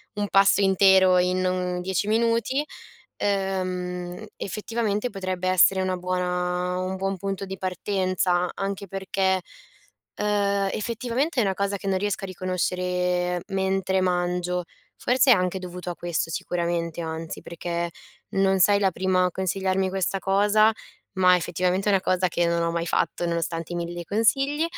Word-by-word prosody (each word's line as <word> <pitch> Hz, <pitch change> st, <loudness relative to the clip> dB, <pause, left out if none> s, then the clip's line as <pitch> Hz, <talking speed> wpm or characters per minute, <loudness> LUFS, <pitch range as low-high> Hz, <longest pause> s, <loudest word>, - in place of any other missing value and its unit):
un 205 Hz, 0 st, -1 dB
pasto 195 Hz, 0 st, +5 dB
intero 190 Hz, -1 st, +5 dB
in 185 Hz, +1 st, +1 dB
un 180 Hz, -1 st, -1 dB
10 190 Hz, +2 st, -1 dB
minuti. 230 Hz, +5 st, +1 dB, 0.5 s
Ehm, 185 Hz, -1 st, -2 dB
effettivamente 215 Hz, +2 st, -2 dB
potrebbe 185 Hz, -2 st, -3 dB
essere 185 Hz, +1 st, +4 dB
una 185 Hz, 0 st, -1 dB
buona 180 Hz, 0 st, -1 dB
un 185 Hz, +1 st, -2 dB
buon 195 Hz, +1 st, -2 dB
punto 195 Hz, +1 st, -3 dB
di 190 Hz, 0 st, -6 dB
partenza 185 Hz, -1 st, 0 dB
anche 195 Hz, 0 st, -4 dB
perché, 190 Hz, 0 st, 0 dB, 0.8 s
ehm, 200 Hz, -1 st, +1 dB
effettivamente 245 Hz, +6 st, -1 dB
è -, -, +4 dB
una 195 Hz, -, 0 dB
cosa 200 Hz, +1 st, -1 dB
che 195 Hz, -, -5 dB
non 190 Hz, -1 st, +1 dB
riesco 205 Hz, 0 st, -2 dB
a -, -, -2 dB
riconoscere 180 Hz, -1 st, -1 dB
mentre 190 Hz, -1 st, 0 dB
mangio. 180 Hz, 0 st, 0 dB, 0.3 s
Forse 255 Hz, +1 st, +4 dB
è -, -, +9 dB
anche 185 Hz, 0 st, 0 dB
dovuto 180 Hz, 0 st, -6 dB
a 175 Hz, -, -5 dB
questo 170 Hz, -2 st, -2 dB
sicuramente, 170 Hz, -1 st, -2 dB
anzi, 160 Hz, 0 st, -5 dB
perché 170 Hz, 0 st, -4 dB, 0.4 s
non 195 Hz, -1 st, +2 dB
sei 200 Hz, +2 st, +5 dB
la 195 Hz, -1 st, +3 dB
prima 185 Hz, +1 st, +1 dB
a -, -, -1 dB
consigliarmi 190 Hz, 0 st, 0 dB
questa 190 Hz, 0 st, -1 dB
cosa, 205 Hz, +3 st, +4 dB, 0.4 s
ma 185 Hz, -1 st, +5 dB
effettivamente 180 Hz, +3 st, -1 dB
è -, -, +3 dB
una 195 Hz, -, +3 dB
cosa 185 Hz, -1 st, +1 dB
che 175 Hz, 0 st, 0 dB
non 170 Hz, 0 st, +1 dB
ho 170 Hz, -, 0 dB
mai 170 Hz, 0 st, -2 dB
fatto, 175 Hz, -, 0 dB
nonostante 170 Hz, 0 st, -2 dB
i -, -, -2 dB
1000 175 Hz, 0 st, -4 dB
consigli, 270 Hz, -, +1 dB
185 Hz, 155 wpm, -25 LUFS, 180-195 Hz, 0.8 s, è